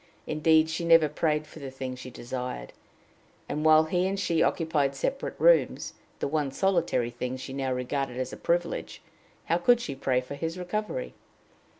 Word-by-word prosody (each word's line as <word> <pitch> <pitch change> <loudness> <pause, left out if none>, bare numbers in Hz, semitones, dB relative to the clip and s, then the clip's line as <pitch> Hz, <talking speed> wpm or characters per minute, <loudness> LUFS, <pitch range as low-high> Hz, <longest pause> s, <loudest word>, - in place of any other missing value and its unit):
Indeed, 155 +1 +3
she 160 +2 -3
never 165 -2 +6
prayed 150 0 0
for 150 - -13
the 140 -2 -6
thing 130 -1 -5
she 130 0 -9
desired; 125 - -6 0.7
and, 150 - -3
while 155 0 +7
he 180 +3 0
and 195 +1 -2
she 165 -3 +1
occupied 150 -5 +1
separate 270 - -2
rooms, - - +3 0.2
the - - -2
one 150 -1 0
solitary 170 -9 +1
thing 125 +1 -4
she 130 +1 -7
now 135 -1 -2
regarded 125 0 -2
as 130 - -3
a - - -7
privilege, 170 0 -2 0.4
how 170 - +1
could 240 +7 +5
she 155 -12 -4
pray 130 -1 +1
for 125 +2 -7
his 165 +4 -4
recovery? 215 - -3
155 Hz, 175 wpm, -28 LUFS, 130-170 Hz, 0.7 s, while